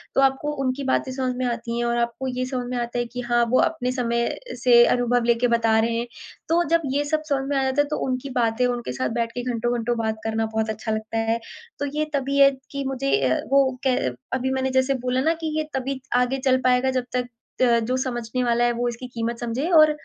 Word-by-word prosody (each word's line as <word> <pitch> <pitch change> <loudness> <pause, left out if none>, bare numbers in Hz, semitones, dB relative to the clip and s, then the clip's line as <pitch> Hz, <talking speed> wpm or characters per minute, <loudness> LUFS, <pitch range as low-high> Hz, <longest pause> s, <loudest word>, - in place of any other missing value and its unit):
तो - - +4
आपको 270 +2 +2
उनकी 260 +2 -1
बातें 260 0 0
समझ 255 -1 -2
में 255 0 -2
आती 235 -1 -3
हैं 240 - 0
और 235 0 0
आपको 235 +2 -2
ये 255 0 -2
समझ 255 -1 -3
में 250 - -2
आता 240 0 -2
है 240 - 0
कि 245 +1 -6
हाँ 240 0 +4
वो 255 - +4
अपने 285 -6 0
समय 235 -2 0 0.4
से 240 -1 +7
अनुभव 245 0 +2
लेके 235 +1 +3
बता 230 -2 +3
रहे 230 +1 +1
हैं। 235 +1 -2 0.4
तो 340 +1 +3
जब 335 0 +3
ये 290 +1 +1
सब 310 +1 0
समझ 270 -1 0
में 285 - 0
आ 270 - +2
जाता 265 +2 +2
है 290 - -1
तो 300 - -2
उनकी 255 +1 -2
बातें 230 +1 +2
उनके 240 - -3
साथ 130 0 -1
बैठ 230 0 -1
के 245 +1 -5
घंटो-घंटो 240 0 -1
बात 220 -1 -1
करना 225 0 0
बहुत 220 0 0
अच्छा 220 +1 -3
लगता 220 +1 -3
है। 230 - 0 0.4
तो 285 - -1
ये 305 - +1
तबीयत 275 0 +3
कि 280 -1 -3
मुझे 270 +1 0
अ, 130 - +1
वो 270 -2 +3
कै 255 - +3 0.4
अभी 260 0 0
मैंने 265 0 0
जैसे 260 +1 +2
बोला 255 +1 +1
ना 320 +4 +2
कि - - 0
ये 310 0 -2
तभी 265 0 -2 0.2
आगे 250 +2 +2
चल 260 -1 +4
पाएगा 255 +1 +3
जब 255 -1 0
तक 250 -1 -1 0.3
अ, 240 -2 +5
जो 235 +3 -1
समझने 250 -1 -2
वाला 240 0 +2
है 240 - +3
वो 240 +1 -1
इसकी 240 +2 -7
कीमत 230 0 -2
समझे 240 +7 -2
और 310 0 +7
250 Hz, 240 wpm, -23 LUFS, 235-265 Hz, 0.4 s, से